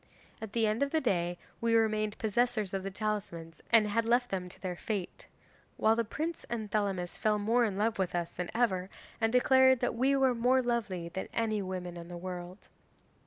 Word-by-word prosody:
At 220 Hz, -2 st, -7 dB
the 230 Hz, -1 st, +2 dB
end 215 Hz, +3 st, 0 dB
of 280 Hz, -, +2 dB
the 315 Hz, -, +1 dB
day 175 Hz, -, 0 dB, 0.2 s
we 230 Hz, 0 st, +2 dB
remained 215 Hz, -1 st, +1 dB
possessors 220 Hz, -2 st, 0 dB
of 195 Hz, -, -1 dB
the 195 Hz, -, -4 dB
talismans 190 Hz, -5 st, -4 dB
and 225 Hz, -3 st, +6 dB
had 230 Hz, +2 st, +1 dB
left 245 Hz, +2 st, +2 dB
them 185 Hz, -2 st, -3 dB
to -, -, -11 dB
their 185 Hz, -2 st, -4 dB
fate, 195 Hz, 0 st, -4 dB, 0.5 s
while 220 Hz, +1 st, +4 dB
the 230 Hz, -, +1 dB
prince 315 Hz, +9 st, -4 dB
and 220 Hz, -3 st, -4 dB
Thelamis 195 Hz, -4 st, -1 dB
fell 215 Hz, -1 st, +2 dB
more 230 Hz, +4 st, +2 dB
in 200 Hz, -3 st, -2 dB
love 220 Hz, +1 st, 0 dB
with 180 Hz, -2 st, -1 dB
us 170 Hz, -1 st, -2 dB
than 180 Hz, -1 st, -5 dB
ever, 190 Hz, -6 st, +1 dB, 0.3 s
and 225 Hz, 0 st, +2 dB
declared 260 Hz, +1 st, +5 dB
that 245 Hz, -, +1 dB
we 260 Hz, +4 st, +2 dB
were 265 Hz, -2 st, +3 dB
more 250 Hz, +2 st, +3 dB
lovely 205 Hz, -8 st, -2 dB
than 190 Hz, +2 st, -5 dB
any 220 Hz, -2 st, 0 dB
women 180 Hz, -2 st, -5 dB
in 170 Hz, 0 st, -8 dB
the 175 Hz, 0 st, -7 dB
world. 180 Hz, +1 st, -7 dB
215 Hz, 205 wpm, -31 LUFS, 185-235 Hz, 0.5 s, and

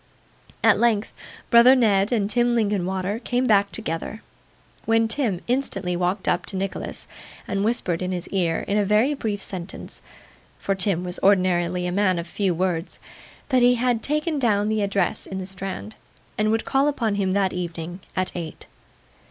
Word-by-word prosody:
At -, -, +5 dB
length 225 Hz, -3 st, +1 dB, 0.4 s
brother 235 Hz, +3 st, +8 dB
Ned 210 Hz, -4 st, +3 dB
and 215 Hz, -5 st, +1 dB
Tim 240 Hz, +3 st, +2 dB
Linkinwater 200 Hz, -2 st, -1 dB
came 250 Hz, +1 st, -1 dB
back 200 Hz, -3 st, +3 dB
together, 215 Hz, +1 st, -5 dB, 0.6 s
when 225 Hz, 0 st, +3 dB
Tim 220 Hz, -6 st, -1 dB
instantly 200 Hz, -8 st, -1 dB
walked 180 Hz, +2 st, -1 dB
up 175 Hz, -, +1 dB
to 195 Hz, -, -2 dB
Nicholas 195 Hz, 0 st, -3 dB, 0.4 s
and 195 Hz, -, -1 dB
whispered 195 Hz, -6 st, 0 dB
in 185 Hz, 0 st, -2 dB
his 180 Hz, -1 st, -4 dB
ear 175 Hz, -4 st, 0 dB
in 205 Hz, +1 st, 0 dB
a -, -, +3 dB
very 210 Hz, +8 st, +3 dB
brief 215 Hz, -7 st, -3 dB
sentence 185 Hz, -1 st, -7 dB, 0.6 s
(for 195 Hz, -, -1 dB
Tim 190 Hz, -2 st, +1 dB
was 180 Hz, 0 st, -2 dB
ordinarily 180 Hz, -2 st, +2 dB
a 180 Hz, -, -1 dB
man 185 Hz, -1 st, +2 dB
of 170 Hz, -, -3 dB
few 185 Hz, 0 st, -1 dB
words), 175 Hz, -1 st, -2 dB, 0.5 s
that 255 Hz, -3 st, +3 dB
he 245 Hz, +1 st, +5 dB
had 245 Hz, -1 st, +1 dB
taken 300 Hz, +2 st, -1 dB
down 210 Hz, -4 st, +2 dB
the 215 Hz, -1 st, 0 dB
address 200 Hz, -2 st, -1 dB
in 190 Hz, -, -5 dB
the 190 Hz, -, -4 dB
Strand, 195 Hz, +3 st, -5 dB, 0.4 s
and 215 Hz, 0 st, +1 dB
would 225 Hz, +1 st, 0 dB
call 270 Hz, +2 st, +2 dB
upon 235 Hz, -7 st, 0 dB
him 195 Hz, -2 st, 0 dB
that 195 Hz, -1 st, +1 dB
evening, 175 Hz, 0 st, -5 dB, 0.2 s
at 185 Hz, 0 st, 0 dB
eight. 165 Hz, -3 st, -7 dB
200 Hz, 170 wpm, -23 LUFS, 185-225 Hz, 0.6 s, brother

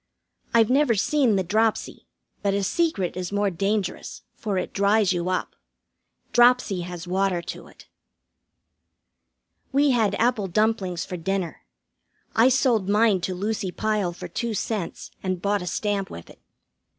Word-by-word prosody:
I've 230 Hz, 0 st, +4 dB
never 275 Hz, -3 st, +3 dB
seen 255 Hz, +1 st, +2 dB
the 190 Hz, -, +1 dB
dropsy, 215 Hz, +4 st, -1 dB, 0.3 s
but 200 Hz, -1 st, +1 dB
a 200 Hz, -, 0 dB
secret 205 Hz, -, 0 dB
is 180 Hz, 0 st, -4 dB
more 205 Hz, -1 st, +1 dB
dangerous, 195 Hz, +2 st, -2 dB
for 205 Hz, -4 st, -3 dB
it 185 Hz, -, -3 dB
dries 200 Hz, -1 st, +3 dB
you 175 Hz, 0 st, -2 dB
up. 185 Hz, -, -2 dB, 0.8 s
Dropsy 240 Hz, -6 st, +4 dB
has 175 Hz, 0 st, -7 dB
water 190 Hz, 0 st, +1 dB
to -, -, -8 dB
it. -, -, -18 dB, 1.8 s
We 280 Hz, +1 st, +3 dB
had 220 Hz, -5 st, +2 dB
apple 230 Hz, -3 st, +1 dB
dumplings 190 Hz, -3 st, 0 dB
for 180 Hz, -, -5 dB
dinner. 185 Hz, 0 st, -3 dB, 0.7 s
I 230 Hz, +3 st, +6 dB
sold 240 Hz, -7 st, +2 dB
mine 210 Hz, -2 st, +3 dB
to 185 Hz, +1 st, -2 dB
Lucy 200 Hz, 0 st, -2 dB
Pyle 210 Hz, -3 st, -1 dB
for 175 Hz, -, -8 dB
two 235 Hz, -2 st, -3 dB
cents, 205 Hz, -3 st, -4 dB
and 185 Hz, -2 st, -2 dB
bought 200 Hz, +1 st, 0 dB
a 180 Hz, -, -6 dB
stamp 200 Hz, 0 st, -1 dB
with 85 Hz, -, -10 dB
it. -, -, -18 dB
200 Hz, 150 wpm, -24 LUFS, 185-225 Hz, 1.8 s, I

